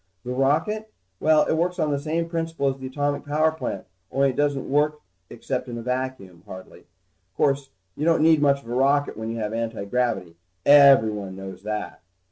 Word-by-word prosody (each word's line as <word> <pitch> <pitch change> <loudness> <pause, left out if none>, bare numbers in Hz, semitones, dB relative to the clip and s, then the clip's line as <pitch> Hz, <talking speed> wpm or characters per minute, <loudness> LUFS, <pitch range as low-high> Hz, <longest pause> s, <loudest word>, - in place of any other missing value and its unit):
The 125 - -3
rocket? 160 +12 0 0.3
Well, 155 -1 +4
it - - 0
works 175 +3 0
on 155 -4 0
the 140 - 0
same 160 +3 -2
principle 165 -3 -2
as 135 0 -5
the 130 - -6
atomic 145 +1 -2
power 155 +2 +1
plant, 130 -11 -5 0.3
only 135 0 +2
it - - -11
doesn't 145 -2 0
work 150 +2 +1 0.3
except 130 -2 -4
in 120 - -5
a 115 - -6
vacuum, 125 -8 -4
hardly. 95 0 -11 0.5
Course 135 -1 +1 0.3
you 150 - -4
don't 165 -1 +3
need 160 -2 +5
much 140 -1 +2
of - - -16
a - - -3
rocket 140 +3 +2
when 110 +1 -5
you 115 - -4
have 105 -1 -3
antigravity. 115 -5 -2 0.3
Everyone 110 -9 +5
knows 95 -1 -9
that. 105 -1 -5
140 Hz, 185 wpm, -24 LUFS, 115-150 Hz, 0.5 s, need